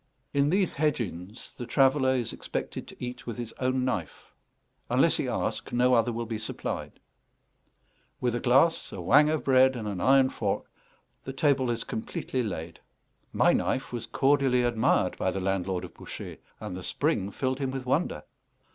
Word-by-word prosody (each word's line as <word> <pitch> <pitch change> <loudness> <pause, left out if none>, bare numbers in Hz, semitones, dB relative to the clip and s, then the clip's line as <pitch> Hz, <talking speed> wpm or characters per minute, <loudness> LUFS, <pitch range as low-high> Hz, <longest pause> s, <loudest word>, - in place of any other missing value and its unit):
In 140 0 +3
these 190 +1 +2
hedge 150 -1 +1
inns 100 0 -6
the 120 - -6
traveller 130 +1 +3
is 120 -3 -2
expected - - -5
to - - -11
eat 125 0 -7
with 115 - -4
his 120 -2 -6
own 130 0 +1
knife; 100 - -4 0.6
unless - - +3
he - - -1
ask, - - -2
no 125 +1 +3
other 120 0 +3
will 115 0 -3
be 110 -1 -4
supplied: 110 - -4 1.3
with 125 -2 0
a 120 - -1
glass, 135 +8 +3
a - - -7
whang 150 +2 +5
of 155 -1 0
bread, 130 0 +5
and 110 -3 -4
an 100 -4 -3
iron 135 +3 +5
fork, - - -2 0.6
the 135 - -6
table 135 -2 +2
is 115 -1 -1
completely 125 +3 -3
laid. 85 -7 -5 0.5
My - - +4
knife 130 - -1
was 120 -2 -4
cordially 135 -3 +3
admired 120 -2 +2
by - - +1
the 95 - -2
landlord 95 -1 -1
of - - -12
Bouchet, - - -8 0.2
and 90 - -6
the 95 - -6
spring 95 +2 0
filled 130 +5 -2
him 135 -2 -1
with 130 -1 -5
wonder. 145 +7 0
125 Hz, 175 wpm, -28 LUFS, 110-135 Hz, 1.3 s, whang